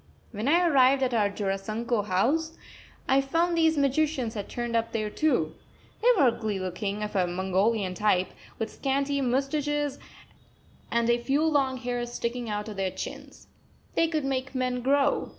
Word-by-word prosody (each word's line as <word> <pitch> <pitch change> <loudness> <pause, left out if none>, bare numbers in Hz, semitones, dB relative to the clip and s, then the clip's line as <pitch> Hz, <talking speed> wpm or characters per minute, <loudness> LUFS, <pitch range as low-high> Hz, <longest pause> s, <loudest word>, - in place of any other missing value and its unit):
When 215 +2 -4
I 345 +4 +4
arrived 270 -3 +4
at 255 -1 0
our 210 -3 +2
Jorasanko 205 +3 -2
house, 285 - +1 0.5
I 270 +1 +4
found 330 +5 +1
these 320 -1 +3
magicians 280 -3 +1
had 205 -2 -5
turned 240 -1 -3
up 230 0 0
there 215 -2 -2
too. 225 - +1 0.5
They 465 - +2
were 275 -7 +6
ugly 220 -3 -3
looking, 195 +3 -3
of 210 0 -5
a 185 -2 +2
Mongolian 190 +2 0
type, 190 -2 +1 0.3
with 225 - -4
scanty 280 +1 0
moustaches 280 +2 -1 0.9
and 235 0 +1
a 240 0 +3
few 280 +5 +1
long 275 -4 +2
hairs 245 -1 -3
sticking 235 0 -3
out 210 0 -3
of 210 -2 -7
their 190 -1 0
chins. - - -8 0.5
They 330 - +3
could 310 -3 -1
make 265 0 -2
men 250 -1 -1
grow. 275 +2 +2
245 Hz, 165 wpm, -27 LUFS, 210-280 Hz, 0.9 s, were